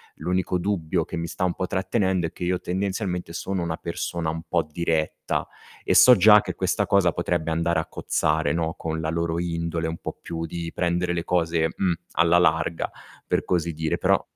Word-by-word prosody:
l'unico 90 0 -1
dubbio 85 -3 -1
che - - -6
mi 85 0 -3
sta 90 - -2
un 90 - 0
po' 95 - -2
trattenendo 95 -2 0
è - - -12
che - - -7
io 90 0 0
tendenzialmente 95 -2 -2
sono 95 +2 -3
una 80 -1 -3
persona 85 -1 -3
un 80 +1 -3
po' - - +1
diretta 80 -1 -1 0.4
e - - +1
so 125 - +9
già 105 +2 +8
che - - -5
questa - - 0
cosa 90 -4 +3
potrebbe 85 -2 -1
andare 85 +1 +1
a - - -2
cozzare, 75 -1 0
no, 80 0 -1
con 80 0 -3
la 80 - -2
loro 85 0 -1
indole 85 -1 -2
un 80 +1 -4
po' - - -7
più 80 -1 -4
di 85 0 -5
prendere 85 0 0
le 85 - -2
cose, 80 -2 +1
mh, 95 -2 +1 0.2
alla 85 +1 +4
larga, 80 -1 +1 0.3
per - - 0
così 85 -2 0
dire. 80 +1 -1
Però - - +2
85 Hz, 195 wpm, -24 LUFS, 80-90 Hz, 0.4 s, so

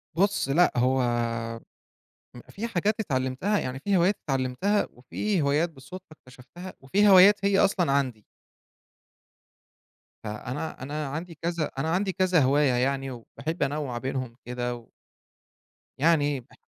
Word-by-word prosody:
بُصّ، 195 -6 +1
لأ، 175 +6 +4
هو 130 +2 +2 1.4
ام 120 - -10
في 220 +4 -5
حاجات 210 -1 0
اتعلمتها، 135 +5 -1
يعني 130 +1 -4
في 200 +3 +1
هوايات 185 +4 +2
اتعلمتها، 135 +10 0
وفي 165 +9 -2
هوايات 150 +4 +1
بالصدفة 165 +6 -11
اكتشفتها، 145 +7 -12
وفي 200 +10 +2
هوايات 195 +2 +7
هي 200 -1 +3
أصلًا 180 -7 +2
عندي. 130 -7 -1 2.0
فأنا 125 +10 -5
أنا 150 +2 -4
عندي 160 +4 -6
كذا 170 -2 -2
أنا 155 +4 -1
عندي 190 +3 0
كذا 185 -2 +2
هواية 140 +1 +3
يعني، 135 +2 0
وباحب 140 +7 -5
أنوع 140 -3 -2
بينهم 130 -2 -4
كده، 120 0 -3
و 120 -1 -14 1.1
يعني 145 -2 +2
بح 125 - -19
145 Hz, 130 wpm, -26 LUFS, 130-185 Hz, 2.0 s, هوايات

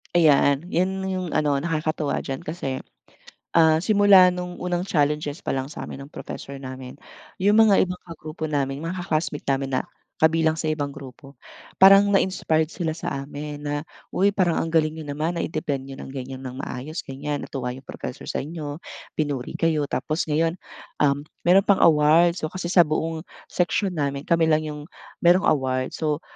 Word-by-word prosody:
Ayan, 145 -3 +4
yan 190 +2 0
yung 185 -1 -2
ano, 145 -2 +2
nakakatuwa 155 -1 -1
diyan. 135 -1 -4
Kasi 135 -5 -4 0.7
ah, 160 -1 +5
simula 200 -3 +6
nung 180 0 -6
unang 180 -1 -2
challenges 150 +1 0
pa - - 0
lang 135 0 -2
sa 150 - -7
amin 135 - -8
ng - - -21
professor 140 0 -7
namin, 130 -1 -8 0.4
yung 205 +4 +4
mga 210 -3 +5
ibang 180 0 -6
kagrupo 155 -1 -6
namin, 140 -1 -1
mga 175 +2 -4
ka-classmate 155 -2 -2
namin 135 -1 0
na - - +1 0.4
kabilang 160 0 +4
sa 160 0 -2
ibang 145 -2 -2
grupo, 135 0 -12 0.5
parang 195 +1 +8
na-inspired 160 -5 +1
sila 165 -2 -3
sa 160 - -4 0.2
amin 145 +1 -6
na, 145 0 -2 0.3
"Uy 195 +3 +3
parang 185 -4 +1
ang 165 - -3
galing 155 -1 +2
niyo 160 - -7
naman, 155 +4 -1
nai-defend 155 -4 -2
niyo 135 - -8
ng 135 - -9
ganyan 130 0 -7
ng 130 +2 -6
maayos 150 +6 -5
ganyan, 145 +2 -4
natuwa 125 -2 -4
yung 130 - -10
professor 125 - -7
sa - - -2
inyo, 150 -1 -5 0.4
pinuri 145 -5 -2
kayo, 165 -2 +1
tapos 155 +1 -2
ngayon, 165 +2 +2 0.5
um, 145 0 +2 0.2
meron 190 +3 +5
pang 200 -2 +3
award." 165 +2 +5
So 155 - -4
kasi 185 -2 -4
sa 175 -2 +6
buong 160 +2 -2 0.2
section 180 0 0
namin, 140 -1 -1
kami 165 -1 +4
lang 155 -1 +3
yung 150 -1 -6 0.4
merong 180 +3 +5
award. 130 -1 -1
So, 155 0 -1
155 Hz, 175 wpm, -24 LUFS, 140-175 Hz, 0.7 s, parang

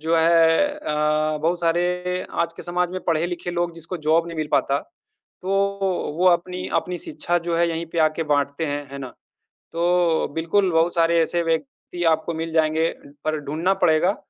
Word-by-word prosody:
जो 160 +2 +1
है 165 - +4
अ, 150 - 0
बहुत 170 +2 +1
सारे 180 +2 0
आज 170 0 -1
के - - -10
समाज 175 0 -1
में 185 0 -4
पढ़े-लिखे 175 +2 -1
लोग 175 -1 -2
जिसको 165 +2 -6
जॉब 165 +2 +3
नहीं 170 - -7
मिल 155 -1 -2
पाता 140 +1 +2 0.6
तो 185 - -6 0.7
वो 185 - +3
अपनी 180 +1 0
अपनी 180 -1 -6
शिक्षा 175 - -2
जो 170 - 0
है 170 0 +3
यहीं 165 0 -3
पे 170 - -2
आके 155 +1 +2
बाँटते 145 +2 0
हैं, 145 0 -3
है 140 - -6
ना? 130 -2 -6 0.6
तो 170 0 +2
बिल्कुल 180 +4 +1
बहुत 165 +1 +2
सारे 170 0 +3
ऐसे 170 +1 0
व्यक्ति 175 - -3
आपको 160 +1 -4
मिल 165 +1 -4
जाएँगे, 160 0 +2 0.3
पर 155 0 0
ढूँढना 165 +7 0
पड़ेगा 160 +5 +3
165 Hz, 175 wpm, -23 LUFS, 160-175 Hz, 0.7 s, है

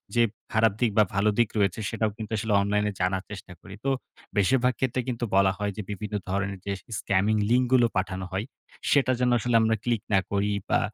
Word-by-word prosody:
যে 120 - +5 0.3
খারাপ 110 -2 +4
দিক 120 -3 +3
বা 110 - +7
ভালো 100 +2 +3
দিক 120 -3 +4
রয়েছে, 100 -1 +1
সেটাও 110 -2 -1
কিন্তু 110 -2 -7
আসলে 105 0 -1
অনলাইনে 105 +1 +1
জানার 95 +1 0
চেষ্টা 95 -3 -9
করি। 95 -1 -10
তো - - +2 0.5
বেশিরভাগ 125 +5 +3
ক্ষেত্রে 130 -1 0
কিন্তু 120 -1 -2
বলা 95 0 +5
হয় 105 -1 -2
যে, - - -2
বিভিন্ন 105 +1 -5
ধরনের 100 0 -2
যে 100 - -2 0.3
স্কামিং 100 +3 +1
লিঙ্ক 125 +1 +4
গুলো 120 -2 +6
পাঠানো 95 0 -2
হয়, 95 +4 -2 0.5
সেটা 135 -3 +4
যেন 125 0 +2
আসলে 120 +1 0
আমরা 110 0 +2
ক্লিক 120 -3 0
না 95 - +6
করি 100 +1 +1 0.2
বা - - +4
105 Hz, 205 wpm, -26 LUFS, 100-120 Hz, 0.5 s, বা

